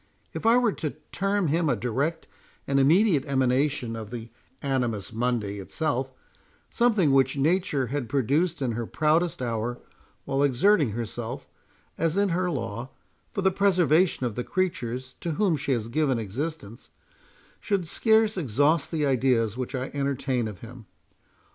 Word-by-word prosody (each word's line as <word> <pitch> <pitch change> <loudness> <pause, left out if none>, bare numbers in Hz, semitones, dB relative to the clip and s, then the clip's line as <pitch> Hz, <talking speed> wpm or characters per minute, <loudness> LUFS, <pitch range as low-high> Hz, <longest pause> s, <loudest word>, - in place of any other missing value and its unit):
—If - - -2
I 230 +2 +6
were 245 -3 +3
to 155 -6 -4 0.2
term 195 -3 0
him 160 +1 +1
a 125 - +2
direct 135 +9 -2 0.4
and 140 0 +1
immediate 160 +2 +4
emanation 130 -2 +1
of 110 -2 -7
the 115 -1 -7 0.3
Animus 120 -7 -1
Mundi 115 -4 -1
itself—something 145 - -1
which 135 0 +3
Nature 150 -2 +1
had 130 0 -3
produced 145 +5 +1
in 125 - 0
her 115 0 -3
proudest 155 -1 +1
hour, 120 +1 -2 0.5
while 135 0 0
exerting 145 - +3
herself, 120 +3 -5 0.5
as 165 +2 +1
is 200 -2 +2
her 180 +1 0
law, 120 -4 -4 0.4
for 195 - -3
the 190 - +4
preservation 180 -6 +3
of 120 - -2
the 125 - -3
creatures 130 -10 -2
to 170 - -3
whom 185 0 +2
she 140 -1 -3
has 115 -4 0
given 135 +1 +1
existence— 115 +1 -5 0.7
should 195 -5 -1
scarce 220 +3 +3
exhaust 145 - +2
the 155 -3 0
ideas 125 -5 +2
which 130 +2 -4
I 130 0 -3
entertain 135 -4 -1
of 105 -4 -9
him. 115 -1 -11
140 Hz, 150 wpm, -26 LUFS, 120-165 Hz, 0.7 s, I